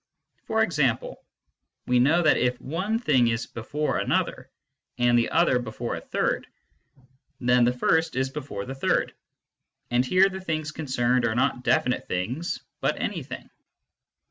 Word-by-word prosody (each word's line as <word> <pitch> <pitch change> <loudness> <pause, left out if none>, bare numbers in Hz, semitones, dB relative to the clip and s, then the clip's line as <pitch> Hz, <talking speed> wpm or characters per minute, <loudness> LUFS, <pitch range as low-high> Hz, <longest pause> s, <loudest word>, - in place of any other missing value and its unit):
For 220 0 +2
example, 140 - -1 0.6
we 125 0 +3
know 155 +8 +4
that 155 - +5
if 125 0 0
one 185 +10 -2
thing 135 - +3
is 115 0 -1
before 150 +6 -3
another, - - -1 0.5
and 120 -1 +3
the 120 -1 +2
other 160 -6 +3
before 120 0 -4
a - - -6
third, - - -1 0.9
then 125 -1 +4
the 120 - +3
first 160 +6 +1
is 130 0 0
before 130 -9 -6
the 135 - -5
third; 135 - 0 0.8
and 120 +1 +3
here 185 +8 +4
the 190 -1 -6
things 155 -4 -3
concerned 125 -5 0
are 110 - 0
not 125 0 0
definite 125 +1 +1
things, 125 - -3 0.2
but - - 0
"anything." - - -4
130 Hz, 145 wpm, -25 LUFS, 120-160 Hz, 0.9 s, that